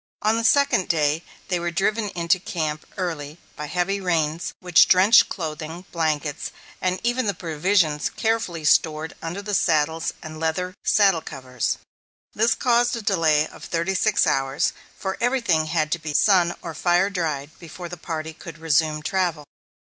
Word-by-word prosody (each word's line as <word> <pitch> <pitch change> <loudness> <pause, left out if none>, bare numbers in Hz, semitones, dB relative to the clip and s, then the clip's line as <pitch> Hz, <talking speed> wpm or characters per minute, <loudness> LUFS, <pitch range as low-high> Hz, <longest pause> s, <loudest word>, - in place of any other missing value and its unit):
On 215 +1 +3
the 230 - -1
second 275 -5 +3
day 155 -1 +1 0.3
they 180 -2 0
were 175 0 -2
driven 205 +4 0
into 170 +1 +2
camp 155 -4 -4
early 160 -5 -4 0.2
by 150 - -6
heavy 180 +5 -1
rains 165 -3 -1
which 180 -2 +5
drenched 190 +5 +6
clothing, 160 0 -5
blankets, 155 -3 -1 0.3
and 185 0 0
even 240 0 0
the 200 - 0
provisions 165 -2 +1
carefully 220 -8 -2
stored 155 0 +2
under 175 +5 -5
the 205 0 -4
saddles 160 -4 +1
and 155 0 -8
leather 165 +3 -1
saddle 195 -6 +4
covers. 130 -5 -3 0.6
This 225 +2 +2
caused 240 -1 +2
a 230 - -6
delay 160 -6 +3
of - - -14
thirty 170 +3 -1
six 210 +2 +2
hours, 135 +3 +1 0.2
for 190 0 -4
everything 235 -11 +1
had 155 -1 0
to 170 - 0
be 155 -2 -5
sun 180 -3 +4
or 165 - -5
fire 175 +5 +2
dried 155 -6 -3
before 175 +1 -9
the 180 - -7
party 160 -1 -5
could 165 0 -11
resume 155 -1 +1
travel. 170 -3 -1
170 Hz, 160 wpm, -23 LUFS, 155-195 Hz, 0.6 s, drenched